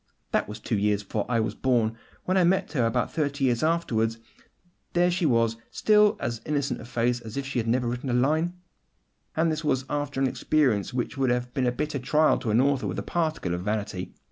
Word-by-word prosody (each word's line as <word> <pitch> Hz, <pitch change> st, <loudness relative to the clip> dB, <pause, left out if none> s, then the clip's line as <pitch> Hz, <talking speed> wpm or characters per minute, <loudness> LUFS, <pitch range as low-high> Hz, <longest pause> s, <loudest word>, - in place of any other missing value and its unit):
That -, -, 0 dB
was 105 Hz, +1 st, -7 dB
two 110 Hz, -1 st, -1 dB
years 105 Hz, 0 st, +1 dB
before 105 Hz, +1 st, -3 dB
I 115 Hz, -2 st, +2 dB
was 110 Hz, -, -1 dB
born. 115 Hz, -4 st, +1 dB, 0.3 s
When 185 Hz, -, +1 dB
I 185 Hz, -, +4 dB
met 185 Hz, +2 st, +2 dB
her 125 Hz, -7 st, +2 dB
about 120 Hz, +1 st, -1 dB
thirty 140 Hz, -3 st, -1 dB
years 120 Hz, -2 st, +1 dB
afterwards, 120 Hz, -9 st, +1 dB, 0.8 s
there 175 Hz, +1 st, +3 dB
she 175 Hz, -2 st, +1 dB
was, 115 Hz, -3 st, +2 dB
still 210 Hz, -1 st, +4 dB
'with 220 Hz, -, -18 dB
as 115 Hz, -1 st, -3 dB
innocent 145 Hz, -4 st, -1 dB
a -, -, -9 dB
face 120 Hz, 0 st, 0 dB
as 115 Hz, +1 st, -8 dB
if 140 Hz, -, -2 dB
she 135 Hz, -2 st, -2 dB
had 115 Hz, -, -2 dB
never 120 Hz, +1 st, +1 dB
written 125 Hz, +3 st, -3 dB
a -, -, 0 dB
line!' 155 Hz, +8 st, +2 dB, 0.8 s
And 160 Hz, +1 st, +2 dB
this 155 Hz, 0 st, -3 dB
was 130 Hz, -3 st, 0 dB
after 145 Hz, -2 st, -2 dB
an 135 Hz, -, +3 dB
experience 130 Hz, -5 st, +1 dB
which 125 Hz, +2 st, -3 dB
would 130 Hz, -2 st, +2 dB
have 125 Hz, 0 st, -1 dB
been 130 Hz, -2 st, +1 dB
a -, -, +2 dB
bitter 150 Hz, +3 st, -2 dB
trial 150 Hz, +4 st, +3 dB
to 115 Hz, -, -3 dB
an 110 Hz, +2 st, +3 dB
author 140 Hz, 0 st, +2 dB
with -, -, -4 dB
a -, -, -2 dB
particle 155 Hz, -, -1 dB
of 90 Hz, -, -2 dB
vanity. 105 Hz, -2 st, -3 dB
130 Hz, 225 wpm, -26 LUFS, 115-150 Hz, 0.8 s, I